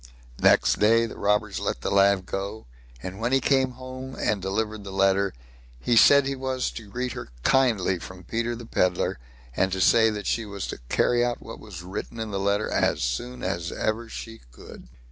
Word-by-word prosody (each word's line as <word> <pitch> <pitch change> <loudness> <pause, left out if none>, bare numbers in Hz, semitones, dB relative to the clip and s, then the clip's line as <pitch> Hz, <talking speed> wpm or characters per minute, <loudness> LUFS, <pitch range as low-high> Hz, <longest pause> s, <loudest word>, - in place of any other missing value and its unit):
Next - - +4
day 115 +2 +4
the 115 - -7
robbers 105 -2 0
let - - -3
the - - -2
lad 100 -1 +4
go, 100 +4 -5 0.4
and 95 +2 -6
when 115 +2 -1
he 135 - +4
came 130 -1 +2
home 130 +1 -8
and 105 -2 0
delivered 105 +2 -2
the 100 - -8
letter, 95 0 +2 0.5
he 120 - +1
said 140 +4 +7
he 135 0 -1
was 130 -1 -2
to 110 -3 -9
greet 125 +3 -3
her - - -7
kindly 110 -9 +2
from 95 +2 -10
Peter 115 +5 -2
the 120 0 -9
Pedlar, 90 - 0 0.4
and 95 - +1
to 95 - -2
say 110 +3 +5
that 105 -2 -4
she 115 - 0
was 100 -3 -5
to - - -5
carry 120 0 +2
out 120 0 -1
what 115 - -10
was 95 -5 -9
written 100 +5 -6
in 110 -1 -4
the 100 - -2
letter 100 +2 +1
as - - +1
soon 120 - -3
as 85 -2 -2
ever 110 +1 -2
she 115 0 -8
could. - - -13
110 Hz, 200 wpm, -25 LUFS, 95-120 Hz, 0.5 s, said